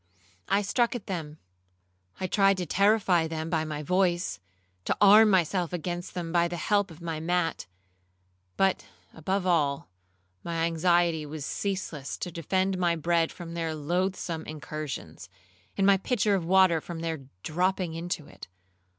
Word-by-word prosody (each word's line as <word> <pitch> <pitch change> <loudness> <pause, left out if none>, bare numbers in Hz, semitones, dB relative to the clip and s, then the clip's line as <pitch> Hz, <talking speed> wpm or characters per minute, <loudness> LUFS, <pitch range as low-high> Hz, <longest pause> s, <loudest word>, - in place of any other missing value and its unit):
I 200 +2 +3
struck 240 +5 +1
at 235 - -6
them;—I 90 - -9
tried 195 +1 +3
to 180 - -2
terrify 195 -2 +3
them 160 0 -4
by 160 -2 +1
my 150 -1 -5
voice, 175 - +1 0.5
to - - 0
arm 210 +2 +8
myself 180 -2 +1
against 175 +1 -4
them 170 -2 -4
by 170 0 +3
the 175 0 -5
help 200 +3 +1
of 165 +1 -13
my 165 -2 -3
mat; 170 - -1 0.9
but 195 -1 +2 0.3
above 185 +4 -2
all, 145 - +1 0.5
my 165 -1 -1
anxiety 170 -1 +2
was 150 -1 -6
ceaseless 185 -8 -3
to 180 - -5
defend 185 +3 -1
my 175 -2 +2
bread 165 0 +1
from 170 -2 -9
their 165 -2 -2
loathsome 170 +1 -2
incursions, 155 -1 -7 0.5
and 195 - +2
my 200 0 +6
pitcher 210 0 +1
of 190 -3 +1
water 185 -2 +4
from 165 0 -7
their 160 -4 -4 0.2
dropping 180 +1 0
into 165 -2 -4
it. - - -12
170 Hz, 150 wpm, -28 LUFS, 160-190 Hz, 0.9 s, arm